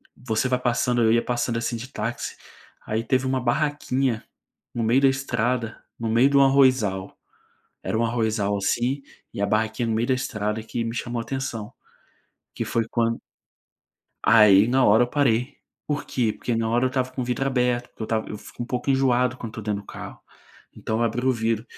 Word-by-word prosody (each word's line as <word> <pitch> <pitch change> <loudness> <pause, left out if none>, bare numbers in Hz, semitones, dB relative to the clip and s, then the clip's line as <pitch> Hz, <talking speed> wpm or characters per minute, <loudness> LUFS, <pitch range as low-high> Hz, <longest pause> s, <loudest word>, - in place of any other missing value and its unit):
você 120 0 -1
vai 125 -1 +1
passando 120 0 +1
eu 110 - +4
ia 115 - +3
passando, 120 -1 -1
assim, 115 +1 -2
de 125 +3 -7
táxi, - - -4 0.5
aí 110 +1 -1
teve 130 +2 +1
uma 130 -1 0
barraquinha 130 -2 0 0.5
no 115 - -1
meio 120 +5 +3
da 135 - +6
estrada, 125 -3 -2 0.2
no 115 -1 -2
meio 120 +5 +4
do 140 0 +5
arrozal, 130 -8 +3 0.7
era - - -1
um 115 - +1
arrozal, 110 -3 0
assim, 125 +7 0 0.3
e 100 - -4
a - - +3
barraquinha 110 +2 0
no 110 - 0
meio 115 +2 0
da 130 - +3
estrada 105 -4 -2
que 115 +1 -3
me 115 +1 -4
chamou 120 -1 -3
atenção, 120 -4 -4 0.8
que - - -3
foi 115 -1 0
quan 115 -1 0 1.0
Aí 105 -2 +7
na 130 +1 +3
hora 110 +4 +6
eu - - -4
parei. 125 -1 +1 0.3
Por 145 -1 -2
quê? 115 -4 0
Porque 120 - -3
na 115 0 0
hora 120 +3 +2
eu - - +3
estava 130 0 -1
com 130 - -3
o - - -2
vidro 125 +2 -1
aberto, 125 -2 0
porque - - -7
eu - - -1
esta - - -7
eu 105 - -5
fico 120 - -9
um - - -5
pouco 125 +2 -2
enjoado 125 -2 +2
quando 115 -3 -7
estou 110 0 -8
dentro 105 -1 -2
do - - -25
carro. - - -9 0.6
Então 110 +1 -3
eu 120 - +2
abri 120 +3 -1
o 130 - +4
vidro 115 -1 -1
120 Hz, 200 wpm, -24 LUFS, 110-130 Hz, 1.0 s, Aí